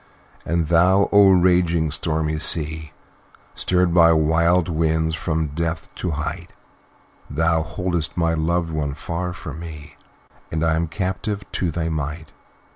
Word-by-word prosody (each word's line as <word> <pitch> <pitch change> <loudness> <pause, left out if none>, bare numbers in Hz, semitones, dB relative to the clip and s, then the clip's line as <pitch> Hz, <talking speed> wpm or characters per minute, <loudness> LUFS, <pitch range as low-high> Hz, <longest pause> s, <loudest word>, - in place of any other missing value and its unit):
"And 85 -2 0
thou, 90 +4 +4
O 100 -1 +7
raging, 90 -3 +3
stormy 80 0 -1
Sea, 80 -1 0 0.6
Stirred 90 -1 +1
by 85 -1 +6
wild 80 +2 +2
winds, 80 -1 0
from 80 -1 -2
depth 80 +2 -4
to 90 - -4
height, 75 +3 -4 0.8
Thou 80 +2 +1
hold'st 85 0 -3
my 85 -1 +1
loved 80 +1 0
one 75 -3 -2
far 90 +3 -4
from 80 -3 -8
me, 75 -3 -9 0.6
And 80 0 -1
I 80 -1 +2
am 85 +1 -1
captive 95 +3 -3
to 90 - -1
thy 80 0 -2
might. 80 0 -4
80 Hz, 135 wpm, -22 LUFS, 80-85 Hz, 0.8 s, O